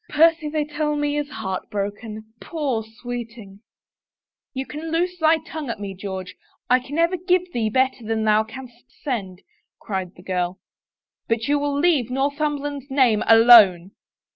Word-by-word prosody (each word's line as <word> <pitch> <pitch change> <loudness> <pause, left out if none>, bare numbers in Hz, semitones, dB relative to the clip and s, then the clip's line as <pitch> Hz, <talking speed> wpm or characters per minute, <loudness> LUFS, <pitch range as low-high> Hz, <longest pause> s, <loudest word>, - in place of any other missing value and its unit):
Percy, 320 0 +3
they 300 0 -1
tell 300 0 -2
me, 290 0 -1
is 295 -1 -2
heart 190 -7 -5
broken 215 +2 -5
— - - -41
poor 280 -9 -2
sweeting! 225 -3 -8 0.3
" - - -71
" - - -71
You 265 +1 -3
can 315 +3 -7
loose 360 +2 -1
thy 320 0 +4
tongue 315 -3 -7
at 230 - -4
me, 200 -1 -5
George 190 -1 -6 0.2
— - - -44
I 250 - +6
can 275 +4 -7
ever 335 +2 +2
give 360 0 0
thee 225 -2 0
better 260 +1 +1
than 220 0 -1
thou 215 0 +3
canst 240 +2 -12 0.2
send," 195 -10 -4 0.4
cried 190 -3 -5
the 180 - -15
girl, 180 0 -2 0.3
" - - -66
but 230 0 0
you 290 0 +2
will 285 0 -1
leave 290 -6 +2
Northumberland's 285 +1 -2
name 255 -6 +3
alone." 220 -6 +7
250 Hz, 175 wpm, -22 LUFS, 215-295 Hz, 0.4 s, alone